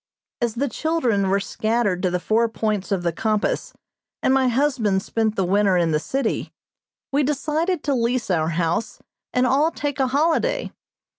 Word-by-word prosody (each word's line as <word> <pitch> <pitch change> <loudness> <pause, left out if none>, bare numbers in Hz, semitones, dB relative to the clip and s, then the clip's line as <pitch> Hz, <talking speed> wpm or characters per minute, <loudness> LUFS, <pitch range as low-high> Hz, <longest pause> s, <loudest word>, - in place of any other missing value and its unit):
As 235 -2 0
the 275 +4 0
children 240 -8 0
were 195 +1 +2
scattered 215 -2 -1
to 185 - +1
the 180 0 -1
four 225 +6 +1
points 215 -3 -2
of 190 -3 0
the 170 - +1
compass 215 +3 -1 0.5
and 260 - +3
my 265 -1 +3
husband 240 -7 +1
spent 220 -1 -1
the 190 - +1
winter 195 0 +3
in 170 -2 +2
the 150 - +2
city, 260 - -2 0.6
we 280 +2 +2
decided 300 +4 -1
to 285 - 0
lease 240 -3 0
our 160 -2 +1
house 170 +6 -1 0.3
and 250 0 +2
all 280 +5 +3
take 290 -3 -4
a 265 - +3
holiday. 330 - +1
230 Hz, 170 wpm, -22 LUFS, 195-275 Hz, 0.6 s, and